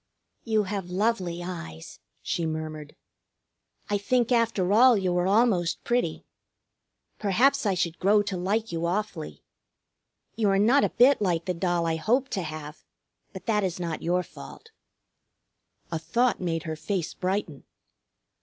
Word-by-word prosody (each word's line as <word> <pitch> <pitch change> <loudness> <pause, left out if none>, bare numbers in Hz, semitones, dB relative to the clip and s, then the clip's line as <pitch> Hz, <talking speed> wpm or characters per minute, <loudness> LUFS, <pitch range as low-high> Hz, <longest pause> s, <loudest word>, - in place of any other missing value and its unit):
"You 220 -2 +1
have 195 -2 -4
lovely 185 -3 -1
eyes," 80 - -8 0.2
she 175 - -2
murmured. 155 -1 -5 0.9
"I 205 0 0
think 240 +3 +1
after 230 -6 +2
all 245 +1 +6
you 185 -2 0
are 180 +1 +1
almost 195 -5 +2
pretty. 245 +1 -1 0.9
Perhaps 235 +6 +2
I 195 - +2
should 170 -2 -2
grow 205 +2 +4
to 200 -2 -4
like 205 +5 -1
you 170 0 -2
awfully. 185 -3 -4 0.9
You 215 -3 +1
are 195 - +3
not 235 +8 +4
a - - +2
bit 260 0 +4
like 175 -4 0
the 185 - -1
doll 175 -1 0
I 165 -1 0
hoped 250 - +1
to 195 - -1
have; 155 -1 -7 0.5
but 190 - -10
that 210 -3 +1
is 180 -2 -2
not 170 -3 -3
your 180 +2 +1
fault." 455 - -12 1.2
A 165 - -2
thought 235 +7 +1
made 165 -2 -2
her 160 -2 -4
face 165 +2 -3
brighten. 185 -6 -3
190 Hz, 150 wpm, -26 LUFS, 170-215 Hz, 1.2 s, all